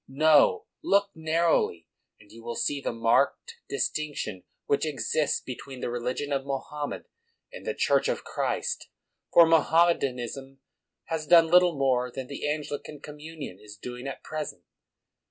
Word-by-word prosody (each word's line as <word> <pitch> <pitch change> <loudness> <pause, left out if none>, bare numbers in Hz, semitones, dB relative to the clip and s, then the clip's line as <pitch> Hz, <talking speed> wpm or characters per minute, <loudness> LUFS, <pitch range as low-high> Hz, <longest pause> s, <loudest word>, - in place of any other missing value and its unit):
No; 150 +2 +4 0.2
look 200 0 +3
narrowly, 160 - +1 0.3
and 105 - -19
you 115 - -12
will 120 0 -4
see 145 +3 -1
the - - -2
marked 115 0 +1
dis - - +1
tinction 145 -11 -4 0.2
which 140 - +1
exists 150 0 0
between 130 +1 -8
the 120 - -3
religion 125 +4 -2
of 135 -1 0
Mo 135 -1 -3
hammed 150 -1 -4 0.5
and - - -9
the - - -1
Church - - +2
of - - -1
Christ. 475 -1 -2 0.4
For 170 - +8
Moham 165 +1 +4
medanism 135 +1 -4 0.5
has 160 -2 -4
done 165 -1 +7
little 180 -2 +5
more 125 -2 +2
than 130 +1 -5
the 140 +2 -4
Angli 150 -1 -2
can 150 - -10
communion 150 - -9
is 105 -1 -12
doing 125 +4 -7
at 135 - -7
present. 150 - -5
140 Hz, 155 wpm, -27 LUFS, 125-160 Hz, 0.5 s, For